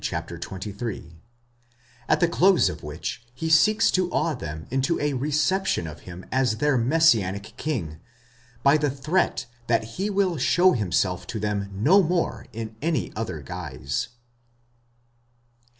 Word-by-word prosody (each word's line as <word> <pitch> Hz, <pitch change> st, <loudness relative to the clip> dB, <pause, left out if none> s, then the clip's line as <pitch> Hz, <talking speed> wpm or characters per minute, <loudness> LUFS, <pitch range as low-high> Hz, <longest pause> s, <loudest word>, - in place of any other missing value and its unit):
xxiii), 95 Hz, -2 st, -5 dB, 1.0 s
at 155 Hz, -, +4 dB
the 175 Hz, -, +4 dB
close 185 Hz, +2 st, +4 dB
of -, -, -7 dB
which 75 Hz, +9 st, -5 dB
he 160 Hz, +5 st, -2 dB
seeks 215 Hz, +7 st, +5 dB
to 185 Hz, -1 st, +1 dB
awe 165 Hz, -2 st, 0 dB
them 80 Hz, -, -6 dB
into 135 Hz, +5 st, +1 dB
a 145 Hz, -1 st, 0 dB
reception 150 Hz, -, 0 dB
of 75 Hz, -2 st, -8 dB
him 90 Hz, +1 st, -9 dB
as 130 Hz, -4 st, +1 dB
their 150 Hz, +1 st, +2 dB
messianic 115 Hz, -, +2 dB
king, 90 Hz, -, -3 dB, 0.6 s
by 140 Hz, +2 st, +6 dB
the 150 Hz, -1 st, +1 dB
threat 150 Hz, +7 st, 0 dB, 0.2 s
that 115 Hz, -1 st, +2 dB
he 180 Hz, -, -3 dB
will 195 Hz, -4 st, +1 dB
show 175 Hz, +7 st, +4 dB
himself 90 Hz, -, 0 dB
to 110 Hz, -, -4 dB
them 100 Hz, -1 st, -2 dB
no 145 Hz, -, +4 dB
more 175 Hz, 0 st, -1 dB
in 110 Hz, -1 st, -6 dB
any 160 Hz, 0 st, -1 dB
other 110 Hz, -9 st, -4 dB
guise. 65 Hz, +1 st, -4 dB
130 Hz, 135 wpm, -25 LUFS, 100-165 Hz, 1.0 s, by